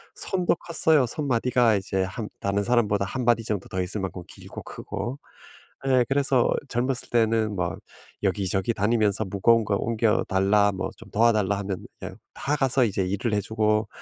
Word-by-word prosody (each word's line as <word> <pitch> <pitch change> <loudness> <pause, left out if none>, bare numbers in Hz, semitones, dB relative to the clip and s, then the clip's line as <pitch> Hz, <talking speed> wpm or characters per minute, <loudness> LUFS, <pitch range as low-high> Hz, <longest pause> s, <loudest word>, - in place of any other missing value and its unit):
손도 180 -3 0
컸어요. 160 -5 +2
손마디가 125 -4 +2
이제 95 -1 -1
한 105 +3 -5
다른 100 +1 0
사람보다 105 -4 +2
1 125 +5 -4
마디 115 -1 +3
정도 105 -3 -3
더 95 0 -2
있을 95 +3 -3
만큼 90 -1 -4
길고 - - -10
크고. 105 +6 -6 0.7
예. 130 -2 +4
그래서 135 -2 +2 0.2
젊었을 125 +2 -2
때는 110 -2 +2
막 90 0 -2 0.4
여기저기 95 +3 0
다니면서 105 0 +1
"무거운 110 +4 +3
거 100 - +1
옮겨 115 -1 +1
달라. 100 +2 +3
뭐 - - -3
좀 - - -13
도와 115 +2 +4
달라." 100 -1 +1
하면 95 -2 -4 0.2
그냥 - - -8 0.2
다 145 +2 -1
가서 135 -1 +2
이제 100 -2 -1
일을 100 +4 -1
해 105 - +2
주고 110 0 0
110 Hz, 330 characters per minute, -25 LUFS, 100-120 Hz, 0.7 s, 예